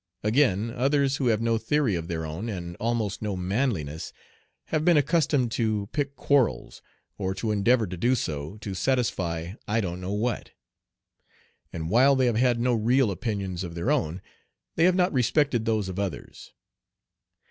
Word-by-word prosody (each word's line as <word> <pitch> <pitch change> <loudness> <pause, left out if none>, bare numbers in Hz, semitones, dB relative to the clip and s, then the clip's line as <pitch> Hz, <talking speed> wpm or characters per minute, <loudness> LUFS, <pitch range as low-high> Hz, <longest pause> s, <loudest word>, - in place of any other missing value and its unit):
Again, 110 -2 +2
others, 135 +2 +1
who 130 - 0
have 115 -1 +2
no 115 -1 +1
theory 125 0 +1
of 85 -2 -3
their 80 -2 -3
own, 85 +9 -5
and 85 -4 -5
almost 110 -3 -1
no 105 -2 -2
manliness, 90 - -2 0.6
have 155 - 0
been 170 -1 +5
accustomed 145 -4 +2
"to 110 -3 -1
pick 140 -2 -2
quarrels," 130 - +1 0.4
or 95 -1 -2
to 110 +1 -2
endeavor 110 +3 +3
to 90 -1 -6
do 120 +8 +2
so, 75 - -4
to 100 -3 -5
satisfy 90 -8 -1
I 110 +2 +1
don't 90 -3 -3
know 95 +2 -3
what; 115 +4 -2 1.2
and 80 -1 -4
while 130 +5 +5
they 130 -1 +2
have 120 -2 +2
had 120 0 +2
no 125 +1 +2
real 120 +1 +2
opinions 95 -4 -3
of 85 -2 -7
their 85 0 0
own, 80 +4 -1 0.5
they 165 - +4
have 180 0 +4
not 180 0 +2
respected 125 -1 +2
those 110 -3 0
of 95 +1 -5
others. 95 -7 -5
110 Hz, 170 wpm, -26 LUFS, 95-130 Hz, 1.2 s, been